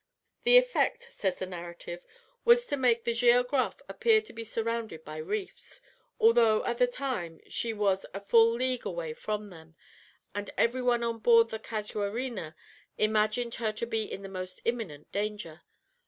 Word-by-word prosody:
"The -, -, +8 dB
effect," -, -, +1 dB
says 190 Hz, -3 st, -1 dB
the -, -, -3 dB
narrative, 175 Hz, -1 st, -8 dB, 0.4 s
"was 480 Hz, +1 st, +6 dB
to 285 Hz, -, -1 dB
make 240 Hz, -4 st, +2 dB
the 235 Hz, -, 0 dB
Géographe 245 Hz, +3 st, +2 dB
appear 445 Hz, -2 st, +3 dB
to -, -, -13 dB
be 230 Hz, -, -6 dB
surrounded 225 Hz, -6 st, -3 dB
by 155 Hz, +1 st, -7 dB
reefs, 390 Hz, -, -5 dB, 0.4 s
although 235 Hz, -, +5 dB
at 240 Hz, 0 st, -2 dB
the 250 Hz, -, +5 dB
time 245 Hz, -11 st, -4 dB
she 230 Hz, -, -2 dB
was 200 Hz, -3 st, +1 dB
a 195 Hz, -, -5 dB
full 225 Hz, +3 st, +5 dB
league 255 Hz, +1 st, -1 dB
away 170 Hz, -3 st, -4 dB
from 210 Hz, +4 st, -4 dB
them, 160 Hz, -1 st, -14 dB, 0.6 s
and 205 Hz, 0 st, -4 dB
every 245 Hz, +2 st, +2 dB
one 240 Hz, -1 st, +2 dB
on 230 Hz, -1 st, -2 dB
board 230 Hz, 0 st, +5 dB
the 220 Hz, -, -5 dB
Casuarina 210 Hz, -4 st, -4 dB, 0.4 s
imagined 215 Hz, +2 st, +1 dB
her 220 Hz, -2 st, +1 dB
to 215 Hz, -, -3 dB
be 225 Hz, -2 st, -2 dB
in 195 Hz, -, -6 dB
the -, -, -6 dB
most 185 Hz, -1 st, -6 dB
imminent 210 Hz, -12 st, -3 dB
danger. 205 Hz, -6 st, -4 dB
225 Hz, 165 wpm, -29 LUFS, 195-245 Hz, 0.6 s, The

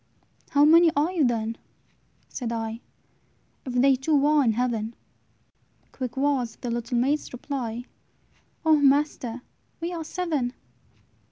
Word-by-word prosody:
"How 285 Hz, +1 st, +5 dB
many 335 Hz, +2 st, +7 dB
are 300 Hz, +5 st, +2 dB
you, 345 Hz, -5 st, +1 dB
then," 230 Hz, -2 st, 0 dB, 0.7 s
said 240 Hz, -3 st, -5 dB
I, 225 Hz, 0 st, -3 dB, 0.9 s
"If 255 Hz, -, -4 dB
they 265 Hz, +2 st, +5 dB
two 280 Hz, +2 st, +1 dB
are 300 Hz, -1 st, +4 dB
in 230 Hz, -3 st, +2 dB
heaven?" 230 Hz, -1 st, -1 dB, 1.0 s
Quick 255 Hz, -1 st, -6 dB
was 265 Hz, -5 st, 0 dB
the 245 Hz, -, -5 dB
little 235 Hz, +1 st, -2 dB
maid's 280 Hz, +5 st, 0 dB
reply, 245 Hz, -2 st, -4 dB, 0.8 s
"O 315 Hz, -1 st, +6 dB
master! 275 Hz, -4 st, +1 dB, 0.4 s
we 340 Hz, +2 st, -3 dB
are 330 Hz, -2 st, -4 dB
seven." 310 Hz, -8 st, -2 dB
265 Hz, 125 wpm, -25 LUFS, 235-295 Hz, 1.0 s, many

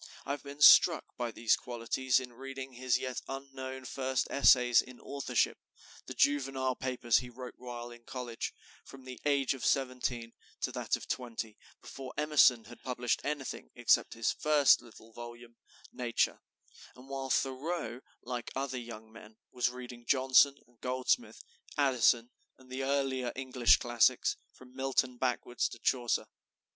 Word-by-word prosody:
I -, -, -3 dB
have 145 Hz, -, -3 dB
been 140 Hz, +1 st, -10 dB
struck 165 Hz, +2 st, +7 dB
by 120 Hz, -1 st, -2 dB
these 115 Hz, -1 st, +2 dB
qualities 125 Hz, +2 st, 0 dB
in 125 Hz, -2 st, -9 dB
reading 135 Hz, +1 st, -8 dB
his 125 Hz, 0 st, +1 dB
yet 130 Hz, -1 st, -4 dB
unknown 135 Hz, -1 st, -7 dB
first 130 Hz, -1 st, -1 dB
essays 125 Hz, -3 st, +6 dB
in 125 Hz, -1 st, -13 dB
authorship, 140 Hz, 0 st, -1 dB, 0.5 s
the -, -, -7 dB
juvenile 135 Hz, -2 st, +1 dB
papers 125 Hz, -3 st, +1 dB
he 125 Hz, -1 st, -8 dB
wrote 125 Hz, +1 st, -9 dB
while 120 Hz, -1 st, -7 dB
in 120 Hz, 0 st, -13 dB
college, 120 Hz, -2 st, -5 dB, 0.3 s
from 135 Hz, -1 st, -13 dB
the 130 Hz, -1 st, -8 dB
age 140 Hz, -2 st, +2 dB
of 135 Hz, -, -8 dB
seventeen 125 Hz, -3 st, -1 dB, 0.3 s
to -, -, -1 dB
that -, -, -1 dB
of -, -, -9 dB
twenty, 115 Hz, -3 st, -4 dB, 0.3 s
before 135 Hz, -1 st, -9 dB
Emerson 150 Hz, -6 st, +5 dB
had -, -, -13 dB
published 125 Hz, -2 st, -1 dB
anything 145 Hz, -3 st, -4 dB
except -, -, +2 dB
his 115 Hz, 0 st, +1 dB
first 150 Hz, -2 st, +4 dB
little 115 Hz, -1 st, -16 dB
volume, 120 Hz, 0 st, -10 dB, 0.3 s
"Nature," 120 Hz, -2 st, 0 dB, 0.5 s
and 125 Hz, +1 st, -14 dB
while 135 Hz, -1 st, -4 dB
Thoreau, 135 Hz, -1 st, -1 dB, 0.2 s
like 120 Hz, -1 st, -4 dB
other 135 Hz, -1 st, -2 dB
young 110 Hz, -2 st, -10 dB
men, 110 Hz, -1 st, -14 dB
was 125 Hz, -1 st, +1 dB
reading 125 Hz, -1 st, -10 dB
Johnson 135 Hz, +1 st, +5 dB
and 120 Hz, -1 st, -30 dB
Goldsmith, 130 Hz, -, -1 dB, 0.3 s
Addison 125 Hz, -4 st, +3 dB, 0.3 s
and 130 Hz, -1 st, -19 dB
the 130 Hz, +1 st, -3 dB
earlier 135 Hz, -2 st, 0 dB
English 125 Hz, -, +4 dB
classics, -, -, +2 dB, 0.2 s
from 130 Hz, 0 st, -17 dB
Milton 130 Hz, -1 st, 0 dB
backward 125 Hz, -1 st, -2 dB
to -, -, 0 dB
Chaucer. 120 Hz, -3 st, 0 dB
130 Hz, 150 wpm, -32 LUFS, 120-135 Hz, 0.5 s, struck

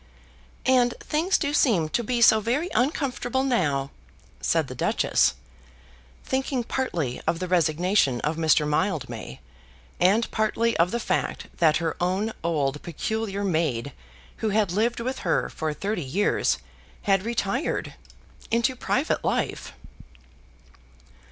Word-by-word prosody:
"And 250 Hz, -2 st, +3 dB
things 330 Hz, +5 st, +1 dB
do 285 Hz, -2 st, -1 dB
seem 215 Hz, -, +3 dB
to 240 Hz, -, 0 dB
be 235 Hz, +1 st, +1 dB
so 220 Hz, -1 st, +7 dB
very 255 Hz, -, -1 dB
uncomfortable 260 Hz, -1 st, 0 dB
now," 145 Hz, -, 0 dB, 0.5 s
said -, -, +1 dB
the -, -, -7 dB
Duchess, -, -, +2 dB, 0.9 s
thinking 265 Hz, -1 st, -1 dB
partly 170 Hz, -, -2 dB
of 170 Hz, -, +2 dB
the 185 Hz, -, -3 dB
resignation 170 Hz, -4 st, +2 dB
of 155 Hz, +2 st, -1 dB
Mr. 155 Hz, -2 st, +3 dB
Mildmay, 140 Hz, -, -2 dB, 0.6 s
and 205 Hz, +6 st, +3 dB
partly 225 Hz, +1 st, +1 dB
of 170 Hz, +2 st, +3 dB
the 235 Hz, -, -2 dB
fact -, -, -2 dB
that 155 Hz, -3 st, +4 dB
her 165 Hz, -1 st, -2 dB
own 190 Hz, +5 st, 0 dB
old 150 Hz, -4 st, 0 dB
peculiar 200 Hz, +4 st, -3 dB
maid 155 Hz, -9 st, 0 dB, 0.5 s
who 220 Hz, -, -1 dB
had 205 Hz, -3 st, +1 dB
lived 230 Hz, +6 st, +1 dB
with 255 Hz, +3 st, -3 dB
her 170 Hz, -, 0 dB
for 155 Hz, -1 st, -3 dB
thirty 200 Hz, +6 st, -3 dB
years 180 Hz, +11 st, +1 dB, 0.5 s
had 195 Hz, -2 st, +3 dB
retired 235 Hz, +4 st, -2 dB, 0.6 s
into 235 Hz, +3 st, +1 dB
private -, -, 0 dB
life. -, -, -2 dB
200 Hz, 125 wpm, -25 LUFS, 160-235 Hz, 0.9 s, so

